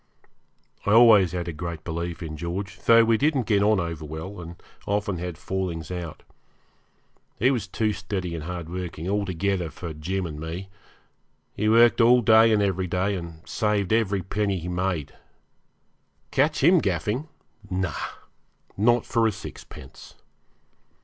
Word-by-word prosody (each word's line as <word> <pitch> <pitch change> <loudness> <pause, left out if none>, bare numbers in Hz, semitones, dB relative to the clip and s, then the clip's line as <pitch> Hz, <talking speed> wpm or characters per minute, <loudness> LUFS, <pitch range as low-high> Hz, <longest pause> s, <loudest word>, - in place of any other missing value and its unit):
I 100 - +2
always 110 -6 +7
had 90 -1 -3
a 85 - -3
great 85 0 -6
belief 85 +1 -4
in 80 -1 -6
George, 90 +3 -5
though 115 0 +7
we 115 -1 +2
didn't 145 -5 +1
get 105 -2 +2
on 105 0 +3
over 85 -3 -4
well, 80 +5 -7
and 85 0 -9 0.3
often 100 -2 -1
had 90 -1 -5
fallings 90 -4 -4
out. 85 -3 -6 1.1
He 125 +5 +3
was 115 -7 -2
too 105 +3 0
steady 95 -3 -4
and 80 -2 -5
hardworking 85 -1 -5
altogether 95 -3 -1
for 80 +2 -7
Jim 90 +5 -3
and 75 -3 -6
me. 85 +5 -6 0.8
He 105 +1 0
worked 115 +2 +5
all 120 +1 +6
day 110 +1 +6
and 105 -2 +3
every 95 -2 0
day, 90 +3 0
and 85 -3 -7
saved 105 -2 0
every 100 -4 +1
penny 100 0 -1
he 85 0 -6
made. 90 -4 -2 1.2
Catch 140 +1 +1
him 175 +2 +6
gaffing! 105 - -1 0.4
no, 90 -3 -1 0.8
not 120 +4 +3
for 115 -1 +2
a - - +1
sixpence. 95 -9 -11
95 Hz, 150 wpm, -25 LUFS, 85-105 Hz, 1.2 s, always